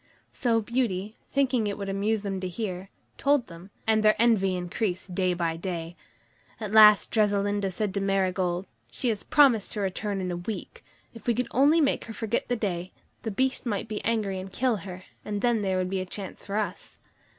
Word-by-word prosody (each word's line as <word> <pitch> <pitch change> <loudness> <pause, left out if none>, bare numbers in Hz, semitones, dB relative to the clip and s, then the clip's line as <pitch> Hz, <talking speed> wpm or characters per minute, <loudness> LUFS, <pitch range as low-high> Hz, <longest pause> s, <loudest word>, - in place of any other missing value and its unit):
So 230 -3 +1
Beauty, 215 -3 -1 0.2
thinking 255 -5 +2
it 200 - -3
would 200 -1 -5
amuse 200 +2 0
them 195 -2 -2
to 185 - -3
hear, 185 -1 -5 0.3
told 285 -3 +3
them, 170 +1 -12 0.2
and 220 -1 +3
their 215 0 +5
envy 210 -5 +3
increased 180 +1 -3
day 180 -1 +1
by 165 -2 -1
day. 170 -1 -5 0.6
At 215 -3 -5
last 215 -1 +7
Dressalinda 205 -2 +1
said 190 +1 -2
to 200 - -1
Marigold: 185 -2 0 0.2
"She 245 - -2
has 215 -3 -1
promised 265 -9 +4
to 210 - -4
return 200 +1 -2
in 185 -1 -2
a 175 - -3
week. 195 +5 -6 0.3
If 230 - -13
we 235 - +3
could 250 +1 -1
only 290 +6 +5
make 280 - +1
her 225 - -7
forget 225 +1 -1
the 245 - 0
day, 185 -5 -3 0.3
the 225 - -3
Beast 260 +4 -1
might 210 -1 -2
be 215 -1 -4
angry 210 -4 0
and 190 +1 -8
kill 245 +1 +1
her, 185 -1 -8 0.2
and 205 -1 -3
then 240 -3 +2
there 190 -2 0
would 185 0 -1
be 190 - 0
a - - -4
chance 190 0 -6
for 200 - -5
us." 205 -3 -3
205 Hz, 200 wpm, -27 LUFS, 185-225 Hz, 0.6 s, last